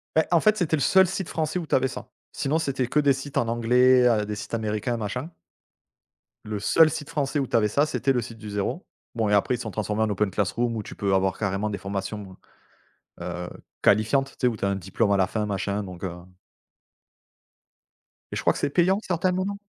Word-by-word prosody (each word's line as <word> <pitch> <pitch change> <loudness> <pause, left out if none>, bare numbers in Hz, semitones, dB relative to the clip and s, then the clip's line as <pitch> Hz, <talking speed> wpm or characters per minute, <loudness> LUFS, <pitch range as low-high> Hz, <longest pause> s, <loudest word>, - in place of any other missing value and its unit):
Beh, 160 - +4
en 170 - +5
fait, 215 +3 +3
c'était 160 -3 +1
le 145 - -3
seul 190 +4 +5
site 190 -1 -4
français 160 +2 -1
où 165 - -5
tu - - +2
avais 130 0 +3
ça, 130 - -8 0.2
sinon 150 +3 0
c'était 135 -5 -1
que 150 - +1
des 140 -2 +4
sites 135 +2 -6
en 115 - +1
anglais, 125 +2 +4
heu, 110 -3 +2
des 105 0 -4
sites 105 - -8
américains, 110 +2 -1
machin 125 - -4 1.2
le 105 -1 -4
seul 160 +9 +5
site 150 -2 -5
français 145 -2 -1
où 135 - -1
tu - - -2
avais 105 -2 +4
ça, 140 +8 +2
c'était 135 -3 0
Le 125 - +1
Site 115 0 -9
du 105 -1 -9
0. 100 -1 -3 0.3
Bon 110 -2 0
et - - +2
après 105 +5 +3
ils - - -4
se 120 - -6
sont 110 - -5
transformés 105 +1 -1
en 110 - 0
OpenClassrooms 105 +4 0
où 110 - -3
tu - - -10
peux 100 -1 0
avoir 95 0 +1
carrément 100 0 -1
des 100 - -3
formations, 100 0 -5 0.8
heu, 90 0 -5 0.3
qualifiantes, 115 +7 +3
tu - - -23
sais, - - +4
où 115 -3 +1
tu 100 - -4
as - - +2
un 100 - 0
diplôme 100 +3 -1
à - - +4
la 95 -1 +3
fin, 105 +2 -2
machin 100 +1 -2
donc, 90 -1 -8
heu 90 -2 -3 2.2
et - - -4
je - - -2
crois - - +3
que - - -6
c'est - - 0
payant 185 +6 +3
certains 180 +1 0
moments. 190 +2 -2
115 Hz, 230 wpm, -25 LUFS, 105-140 Hz, 2.2 s, en